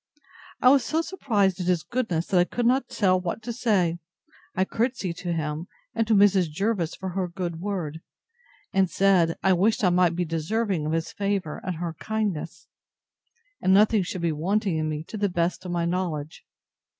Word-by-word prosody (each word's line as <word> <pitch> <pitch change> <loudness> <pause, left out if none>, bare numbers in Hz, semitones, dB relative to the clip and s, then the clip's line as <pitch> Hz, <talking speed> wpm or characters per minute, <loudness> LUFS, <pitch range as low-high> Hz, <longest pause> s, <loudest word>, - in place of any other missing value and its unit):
I 250 - +8
was 270 -1 +5
so 320 +7 0
surprised 205 - 0
at 180 - -3
his 180 -3 +2
goodness, 220 -10 -1
that 185 - +2
I - - +6
could 240 +5 -2
not 250 +1 +2
tell 185 -3 +2
what 180 +5 -4
to 235 +1 -4
say. 190 -8 +1 0.6
I 190 - +2
courtesied 220 -6 -2
to 175 - -4
him, 155 +1 -3 0.3
and 225 - 0
to 220 - +4
Mrs. 195 -4 +4
Jervis 180 0 -1
for 190 - -5
her 185 0 -2
good 170 -2 -4
word; 175 -6 -3 0.7
and 190 -2 +3
said, 180 -4 +3
I 190 - +5
wished 210 +5 +2
I 180 - +4
might 175 -1 +3
be 175 0 0
deserving 165 +1 -1
of 155 - -1
his 165 0 -1
favour, 200 -6 -2
and 185 - -3
her 170 0 -4
kindness: 210 -7 -3 1.0
and 190 - +4
nothing 210 +1 +5
should 180 -1 -4
be 170 - +2
wanting 185 +4 0
in 155 0 -1
me, 155 0 -3
to 215 - -8
the 205 -1 +1
best 175 +1 -1
of 180 - -4
my 170 -1 0
knowledge. 170 -4 -3
185 Hz, 190 wpm, -25 LUFS, 170-210 Hz, 1.0 s, I